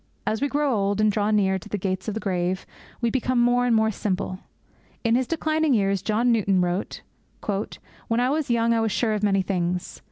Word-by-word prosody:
As 220 - -1
we 285 - +2
grow 285 -1 +1
old, 200 -1 0
and 215 0 +4
draw 205 0 0
near 195 -3 +2
to 170 - -13
the 210 - -2
gates 190 0 -3
of 215 - -2
the - - -2
grave, 185 -2 -1 0.4
we 235 -1 +1
become 255 0 0
more 245 +1 +3
and 235 - +3
more 220 0 +3
simple. 185 -2 -3 0.6
In 230 -1 +2
his 250 +1 +2
declining 315 -3 +1
years, 195 -3 +1
John 225 +4 +1
Newton 200 -4 +2
wrote, 180 +2 -2 1.1
'When 230 +1 +1
I 250 +2 +2
was 305 -2 -1
young 230 -1 +2
I 225 - +2
was 225 -1 0
sure 220 +2 +1
of 210 - -1
many 195 -2 +2
things. 180 -1 -2
215 Hz, 215 wpm, -24 LUFS, 195-240 Hz, 1.1 s, and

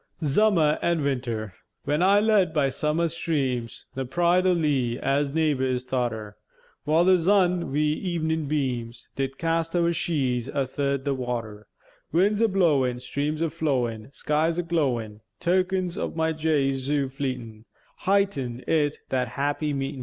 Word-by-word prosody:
] - - -12
ZUMMER 155 0 +3
AN' 170 -3 +1
WINTER 120 -7 -2 0.3
When 150 +3 0
I 195 +3 +5
led 205 -6 +3
by 140 -3 +3
zummer 150 +5 0
streams 135 -8 -2
The 135 - -3
pride 175 +7 +2
o' - - +5
Lea, 140 -8 +1
as 140 +2 0
naïghbours 135 -5 0
thought 125 -2 -1
her, 105 -2 -8 0.5
While 160 +3 +3
the 185 0 +6
zun, 180 -1 +3
wi' 150 +2 0
evenèn 160 -4 -1
beams, 125 -5 -3
Did 135 0 -3
cast 165 0 -1
our 170 -1 +3
sheädes 140 -8 -1
athirt 140 0 -1
the 140 - +1
water: 115 -5 -4 0.4
Winds 200 +6 +2
a 230 - +5
blowèn, 145 - +2
Streams 145 +5 -2
a 165 - +1
flowèn, 130 -8 -2
Skies 155 +3 0
a 175 - 0
glowèn, 125 -11 -1 0.2
Tokens 185 0 0
ov - - -3
my 160 0 +1
jay 155 -3 +1
zoo 135 +1 -1
fleetèn, 125 -5 -5 0.3
Heightened 160 -12 0
it, 150 -2 +1
that 125 -1 0
happy 145 +4 -1
meetèn. 135 0 -3
145 Hz, 155 wpm, -25 LUFS, 130-170 Hz, 0.5 s, the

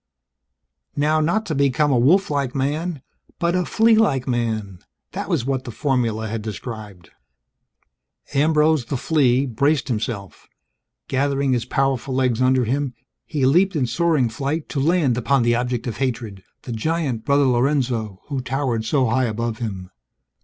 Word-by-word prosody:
Not 155 +1 +2
how 195 +6 +2
to 175 - -4
become 140 +1 +2
a 125 - +3
wolf 185 +10 +3
like 140 -3 -1
man, 150 +3 -2 0.3
but 170 0 0
a 180 -1 +1
flea 225 +1 +4
like 150 - +2
man 110 -6 -2 0.3
that - - -5
was 120 - 0
what 135 -1 -1
the - - -8
formula 115 -4 -1
had 110 +1 -4
described. 105 -4 -8 1.2
Ambrose, 150 -1 +3
the 135 - -3
flea, 135 -2 +2
braced 140 +2 0
himself. 105 -4 -4 0.6
Gathering 140 0 +1
his 120 -2 0
powerful 135 0 -1
legs 130 -2 +1
under 130 -1 +3
him, 135 +2 -1 0.3
he 140 -4 0
leaped 180 +7 +3
in 140 -4 +1
soaring 150 +1 +1
flight 140 +7 -3
to 140 - -2
land 145 -5 +2
upon 135 +1 +2
the 120 0 +3
object 120 0 -1
of 120 -4 -4
hatred 115 -7 -3 0.2
the 125 - -7
giant 130 -1 -1
Brother 140 0 +3
Lorenzo, 120 -5 0
who 140 -3 -2
towered 125 -3 -1
so 130 +3 +2
high 130 +2 +1
above 115 0 -3
him. 95 -6 -5
130 Hz, 155 wpm, -21 LUFS, 115-145 Hz, 1.2 s, flea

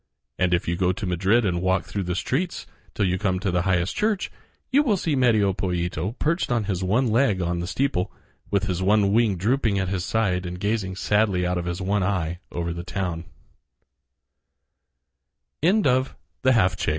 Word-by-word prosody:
And 90 -1 +2
if 90 0 +1
you 85 - 0
go 90 0 +1
to 110 +2 -4
Madrid 95 +6 +2
and 85 -3 0
walk 95 0 +1
through 100 - -4
the 90 0 -2
streets 165 - -2 0.3
till 100 - +1
you 90 0 0
come 95 -3 0
to 95 -1 -1
the 90 0 +1
highest 90 0 0
church, 210 -2 0 0.4
you 280 +3 +5
will 225 -9 +2
see 160 -4 -1
Medio 110 -7 +3
Pollito 90 - -2
perched 165 -1 0
on 120 -3 +1
his 95 -2 -2
one 110 +8 +2
leg 115 -3 +2
on 85 -1 -1
the 85 - -3
steeple, 130 -4 -1 0.4
with 100 -1 +1
his 95 -2 -2
one 100 +1 +3
wing 110 -4 +3
drooping 110 +1 +1
at 95 -1 -1
his 95 -2 -2
side 95 -4 0
and 90 0 -6
gazing 100 -2 -1
sadly 100 -2 +1
out 90 0 0
of 85 - -5
his 90 +2 -3
one 100 +2 +1
eye 90 -3 -1
over 85 -1 -3
the 85 -1 -4
95 Hz, 175 wpm, -24 LUFS, 90-110 Hz, 0.4 s, you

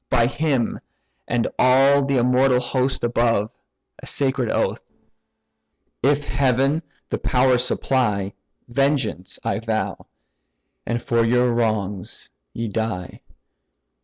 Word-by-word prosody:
By 120 -2 +3
him, 135 -2 0 0.5
and 120 -1 0
all 135 +2 +5
the 135 -1 +1
immortal 125 +1 +3
host 130 +1 -1
above 115 -3 +1 0.5
(A - - -8
sacred 135 -4 0
oath), - - 0 1.2
if 145 +2 +2
heaven 135 +3 +1 0.3
the - - -1
power 125 0 +3
supply, 105 -6 0 0.3
Vengeance 135 -7 -1
I - - -1
vow, 110 -1 -3 0.8
and 120 0 -2
for 115 -1 +2
your 125 +1 +2
wrongs 105 -5 -2 0.2
ye 115 0 -4
die." 105 -4 -4
125 Hz, 105 wpm, -22 LUFS, 115-135 Hz, 1.2 s, all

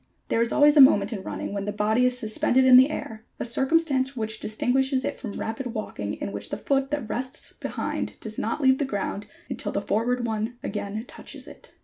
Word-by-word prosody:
There 225 - +2
is 235 - +1
always 295 +1 +5
a 290 - +9
moment 210 -5 +6
in 200 - -4
running 195 - -5
when 200 -1 -3
the 205 - -2
body 215 +4 +2
is 250 0 -1
suspended 245 +3 +2
in 255 -1 +8
the 260 +3 +8
air, 220 -7 -6 0.2
a - - -2
circumstance 265 +1 +1
which 220 -1 -3
distinguishes 260 +4 0
it - - -3
from 220 -6 -6
rapid 225 +2 -4
walking 105 - -4
in - - -5
which 100 0 -6
the - - -3
foot 270 -1 0
that 285 -6 -3
rests 255 +6 -4
behind - - -4
does 215 -1 -7
not 230 +7 -2
leave 265 -1 +4
the - - +1
ground 205 -3 -3 0.2
until - - -4
the - - -1
forward 240 +4 0
one 225 +1 -2
again 210 +2 -4
touches - - -9
it. - - -15
235 Hz, 215 wpm, -25 LUFS, 215-265 Hz, 0.2 s, a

